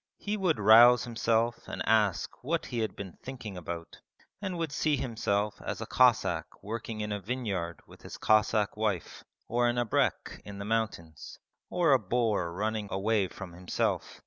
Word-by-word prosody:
He 210 +1 -3
would 185 -6 +1
rouse 120 +4 +8
himself 115 -1 0
and - - -4
ask 105 -2 +1
what 165 +5 -1
he 120 - -4
had 110 -1 -2
been 95 -3 -8
thinking 120 -6 -7
about; 85 -1 -7 0.4
and 190 -3 -3
would 165 -3 -2
see 150 +1 +1
himself 105 -4 -1
as - - -4
a - - -4
Cossack 95 -12 +2
working 110 +1 -5
in 105 0 -3
a 105 - -2
vineyard 100 -6 -3
with - - -17
his - - -9
Cossack 110 -1 +2
wife, 105 -6 -2 0.2
or 120 +1 +2
an 120 0 0
abrek 120 -3 0
in 100 -1 -9
the 100 - -6
mountains, 100 -8 -3 0.3
or 175 -4 +2
a 135 - +6
boar 105 -4 0
running 105 +3 -2
away 100 0 +1
from 90 -1 -9
himself. 90 +1 -2
110 Hz, 170 wpm, -29 LUFS, 100-120 Hz, 0.4 s, rouse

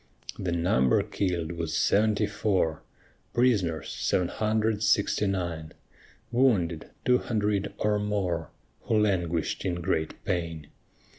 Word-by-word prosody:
The 90 - -2
number 85 -7 +2
kill'd 90 -4 -2
was 85 -1 -3
seventy 105 +1 +3
four, 100 -6 0 0.5
Prisoners, 100 - +2
seven 90 -1 0
hundred 110 0 0
sixty 105 -1 +2
nine, 85 -5 -3 0.6
Wounded, 105 -11 +2 0.2
two 125 0 +4
hundred 105 -3 -1
or 105 -1 +1
more, 95 -6 -1 0.4
Who 110 - +2
languish'd 85 -6 0
in 90 - -1
great 80 -2 -1
pain. 80 -4 -3
95 Hz, 115 wpm, -27 LUFS, 85-105 Hz, 0.6 s, two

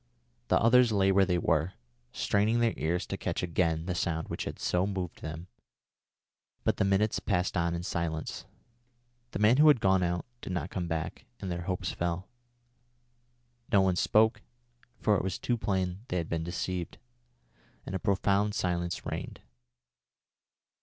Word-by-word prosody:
The - - +4
others 120 +1 +5
lay 95 -2 +3
where 95 -1 +4
they 90 -2 +2
were, 85 +1 +1 0.4
straining 105 +3 +1
their 115 -1 +2
ears 85 +3 -1
to - - -4
catch - - -2
again 85 -2 0
the 90 - -1
sound 80 -2 -2
which - - -3
had - - -5
so 90 +2 +1
moved 95 -4 -4
them, 80 +2 -6 1.2
but - - +1
the - - +2
minutes 100 +2 +2
passed 90 -3 0
on 85 -1 +1
in 85 - -4
silence. 80 -3 -3 0.8
The - - -4
man 105 +5 +5
who 155 +1 +7
had 145 -5 +7
gone 95 -2 +3
out 90 0 -1 0.2
did 95 - -5
not 85 -1 -3
come 90 -2 -3
back, 80 -1 -4
and 95 - -4
their 85 0 -4
hopes 90 -1 -2
fell. 85 +2 -2 1.4
No 100 - +6
one 95 -1 +2
spoke, 110 +4 +3 0.6
for 105 - +2
it - - -2
was 95 -1 -2
too 120 - 0
plain 95 -3 -2
they 90 - -2
had 85 -2 -2
been 80 -1 -1
deceived, 85 +1 -3 0.9
and - - -6
a 95 - -1
profound 100 +1 +1
silence 85 -2 -1
reigned. - - -5
90 Hz, 165 wpm, -30 LUFS, 85-100 Hz, 1.4 s, who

